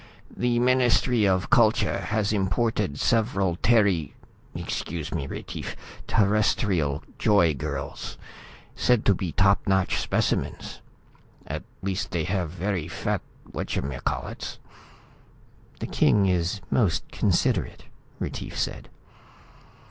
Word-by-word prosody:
"The 120 -1 +1
Ministry 125 -2 +3
of 95 -1 +1
Culture 110 -3 +4
has 105 +2 0
imported 95 -4 0
several 100 -7 +1
Terry 100 -10 +2 0.4
excuse 80 0 -4
me, 70 -5 -2
Retief - - -6 0.3
Terrestrial 100 -8 +2 0.2
joy 90 -7 +4
girls, 70 - -5 0.6
said 125 -3 +2
to 100 - +6
be 90 -2 -3
top 100 +2 +3
notch 95 -1 +2
specimens. - - -1 0.6
At - - -4 0.2
least 95 0 -2
they 85 -2 -1
have 90 0 -1
very 90 -1 -2
fat 85 - -2 0.3
watchamacallits." 65 -1 -3 1.2
"The - - -3
king 100 -2 +3
is 90 +1 0
most 90 - +2
considerate," - - 0 0.4
Retief - - -5
said. - - -3
95 Hz, 100 wpm, -26 LUFS, 85-110 Hz, 1.2 s, to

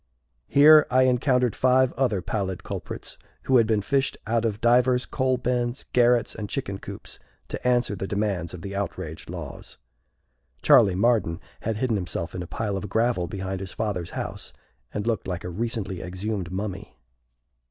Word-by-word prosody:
Here 150 +2 +7
I 130 +1 +4
encountered 125 -2 +2
five 130 0 +3
other 115 -9 0
pallid 95 -4 -3
culprits, - - -6 0.2
who 130 - +4
had 115 -2 +4
been 105 -2 +1
fished 135 +4 0
out 115 +1 +1
of 105 -2 -1
divers 125 +1 +3
coal 130 -1 0
bins, 125 +1 -1
garrets, 120 -1 +4
and 105 -2 -6
chicken 100 -8 -3
coops, - - -9 0.3
to - - -3
answer 120 -3 +2
the 95 0 -4
demands 100 -5 -2
of 90 - -10
the 100 0 -5
outraged 80 -6 -5
laws. 85 -6 -8 0.9
(Charley 95 -3 +6
Marden 105 -5 +2 0.2
had 110 -1 -2
hidden 115 -2 +1
himself 90 -2 -4
in 90 - -4
a 90 - -6
pile 100 +1 -2
of 100 +1 -5
gravel 110 -4 +1
behind 95 0 -4
his 95 -2 -6
father's 100 -6 -2
house, - - -5 0.4
and 105 0 -3
looked 115 -2 -1
like 90 -2 -3
a 90 - -4
recently 100 -1 -3
exhumed 95 0 -4
mummy.) 95 +1 -5
110 Hz, 165 wpm, -25 LUFS, 95-125 Hz, 0.9 s, Here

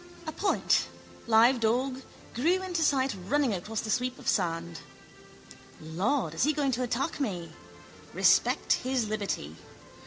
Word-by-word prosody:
A 315 - -4
point, 390 +5 +1 0.4
live 235 +3 +5
dog, 255 +4 0 0.3
grew 345 +10 +1
into 355 -3 -2
sight 275 -5 +2
running 280 -3 +2
across 210 +4 -4
the 220 - -4
sweep 250 +2 -1
of 260 - -12
sand. 170 -3 -1 1.0
Lord, 170 - -1
is 165 - -4
he 300 +4 +3
going 285 -2 0
to 250 0 -2
attack 255 +6 -2
me? 180 - -3 0.6
Respect - - +3
his 255 -3 -1
liberty. 200 - -3
245 Hz, 135 wpm, -28 LUFS, 200-275 Hz, 1.0 s, live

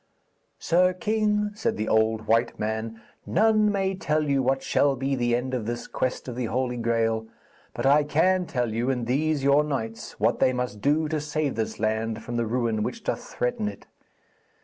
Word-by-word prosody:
'Sir 180 +2 +3
king,' 210 +2 0
said 210 - -2
the 110 +1 -2
old 110 0 +2
white 115 +2 +2
man, 110 +1 -3 0.2
'none 215 - +3
may 195 -1 0
tell 155 -4 0
you 140 -1 +2
what 135 +1 0
shall 140 -1 +2
be 135 +2 -2
the 120 -2 +1
end 130 +2 -3
of 115 -4 -2
this 120 0 -3
quest 130 +1 -3
of 125 - -5
the 125 -1 -2
Holy 125 +2 -1
Graal, 115 -1 0 0.5
but - - -3
I 145 +2 +5
can 175 +5 +2
tell 120 -4 -1
you 120 +3 0
and 125 -3 -1
these 145 +3 0
your 140 +2 +5
knights 115 -7 -5
what - - +2
they 130 - +3
must 125 -5 -3
do 155 +2 +2
to 155 -1 -1
save 150 -1 -1
this 110 -1 -3
land 110 +1 -1
from 120 - -5
the 120 -1 0
ruin 115 -2 0
which - - -4
doth - - -2
threaten 125 -4 -2
it. 100 -1 -7
125 Hz, 195 wpm, -26 LUFS, 115-150 Hz, 0.5 s, I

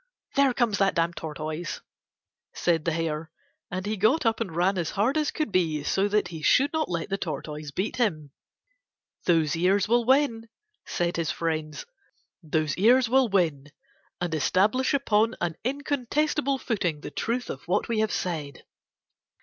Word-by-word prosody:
"There 275 -1 +4
comes 230 -5 +1
that 195 -1 +2
damned 170 0 +1
Tortoise," 155 +1 -5 0.8
said 165 -3 +1
the 165 - +1
Hare, 160 -1 -2 0.4
and 185 +2 -4
he 215 +1 -2
got 220 +10 +3
up 225 0 +1
and 185 -8 -3
ran 185 +2 +2
as 165 - -1
hard 225 +8 +1
as 305 -1 +1
could 310 -8 -2
be 160 -6 +1
so 195 +6 +1
that 210 0 +1
he 165 -3 -7
should 275 - +3
not 315 -1 0
let 170 0 -3
the 195 - -1
Tortoise 150 -3 -5
beat 190 - -3
him. 155 - -1 0.9
"Those 165 -4 +3
ears 185 +4 +2
will 240 +2 +3
win," 240 -3 +2 0.4
said 175 0 -1
his 165 -3 -1
friends. 155 -2 -3 0.6
"Those 155 -2 -1
ears 240 +5 +5
will 260 -1 +4
win; 155 -8 0 0.5
and 175 -2 -2
establish 210 - +2
upon 225 -4 +2
an 170 -2 -2
incontestable 285 +2 0
footing 180 - -2
the - - -7
truth 245 +2 -2
of 135 - -7
what 190 +4 +1
we 230 -2 0
have 220 0 +1
said." 155 -6 -3
190 Hz, 165 wpm, -26 LUFS, 160-235 Hz, 0.9 s, ears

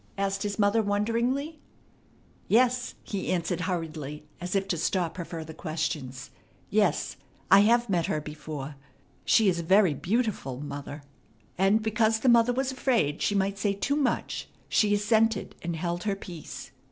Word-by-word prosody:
asked 195 0 -1
his 205 -1 -2
mother 205 +1 +3
wonderingly. 235 +9 0 0.9
"Yes," 250 +2 +2
he 195 -3 -3
answered 175 0 -1
hurriedly, 155 -5 -4
as 180 +2 -4
if 195 0 +1
to 175 - +1
stop 170 0 0
her 175 - -4
further 160 -2 -7
question. 155 -5 -3 0.6
"Yes, - - +1 0.3
I 195 - +9
have 235 +3 +4
met 175 -5 +1
her 155 - 0
before. 150 -1 -7 0.5
She 220 - +4
is 175 -3 +2
very 185 0 +4
beautiful, 185 - -1
mother." 145 0 -7 0.5
And 195 +4 +3
because 220 0 +2
the 260 - +3
mother 235 0 +5
was 265 +2 -1
afraid 235 - 0
she 205 - +1
might 195 0 0
say 200 0 +1
too 280 +8 0
much 275 -5 -1 0.2
she 205 -1 +3
assented, 220 0 +2
and 170 0 -3
held 175 +2 -3
her 200 -2 +1
peace. 175 -5 -9
195 Hz, 155 wpm, -27 LUFS, 165-220 Hz, 0.9 s, I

